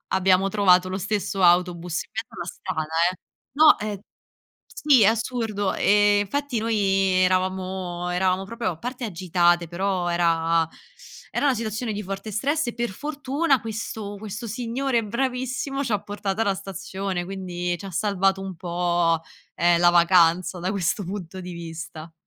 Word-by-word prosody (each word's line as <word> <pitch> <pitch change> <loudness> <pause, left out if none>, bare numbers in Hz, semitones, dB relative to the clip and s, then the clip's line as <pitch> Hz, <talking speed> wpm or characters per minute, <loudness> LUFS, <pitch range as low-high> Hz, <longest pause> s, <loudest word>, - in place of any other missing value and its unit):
abbiamo 190 +1 +3
trovato 185 -3 +4
lo 185 - -2
stesso 195 -1 -2
autobus 175 -1 +2
in - - -26
mezzo 225 +1 -6
la 175 - -4
strada 160 -3 -4 0.2
eh. 185 - -13 0.3
No, 305 +1 +7
è 210 -2 -4 0.7
sì 280 -5 +3
è - - +6
assurdo, 225 -3 0
ehm, 205 0 +4
infatti 255 +3 -2
noi 225 0 0 0.5
eravamo 185 -1 -1
eravamo 185 +1 +1
proprio 230 -1 -3
a 165 - -8
parte 245 +5 -5
agitate 175 -2 +1
però 180 0 -1
era 165 -1 +2 0.7
era - - +1
una 270 -3 +3
situazione 220 0 -3
di 210 +1 -4
forte 195 +3 -6
stress, 275 +3 0
per 240 0 -1
fortuna 285 - 0
questo 220 -2 -5
questo 215 +2 -6
signore 240 +2 -1
bravissimo 260 +4 -2
c'ha 220 -6 0
portato 205 0 -3
alla 200 -3 +2
stazione. 190 -1 -4
Quindi 180 -2 -3
c'ha 195 +4 -8
salvato 195 +1 +1
un 190 -2 -6
po', 170 -1 0 0.4
ehm, 170 0 +3
la 175 - +6
vacanza 175 +1 +4
da 180 - -2
questo 200 +1 -1
punto 185 -1 -6
di 180 - -7
vista. 165 -1 -8
195 Hz, 150 wpm, -24 LUFS, 175-225 Hz, 0.7 s, No